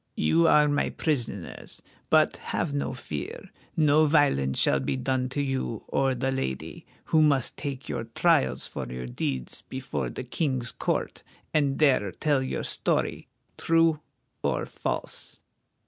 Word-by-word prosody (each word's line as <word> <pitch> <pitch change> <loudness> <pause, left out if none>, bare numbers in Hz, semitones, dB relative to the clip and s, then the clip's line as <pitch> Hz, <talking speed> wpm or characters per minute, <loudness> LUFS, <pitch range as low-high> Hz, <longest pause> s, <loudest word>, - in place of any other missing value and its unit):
You 80 +2 +4
are 150 0 +6
my 145 0 +1
prisoners, 120 - -3 0.3
but - - +4
have 145 - -2
no 140 -2 -1
fear. 75 - -6 0.3
No 155 0 +5
violence 70 - +3
shall 70 - +3
be 65 - -1
done 130 0 0
to 145 +2 -1
you 130 -5 -2
or 135 -1 +1
the 130 +2 -1
lady, 65 - -4 0.3
who 160 - +6
must 140 -4 +3
take 140 -3 -5
your - - -3
trials 65 0 +2
for 65 -2 -6
your 60 0 -5
deeds 60 +1 -3
before 75 - -3
the - - -6
King's 130 -2 -1
court, - - -2 0.3
and 140 -3 +2
there 130 -10 +3
tell 145 - +1
your 130 - -3
story, - - 0 0.3
true 165 -2 +3 0.4
or - - 0
false." - - -4
130 Hz, 145 wpm, -27 LUFS, -, 0.4 s, are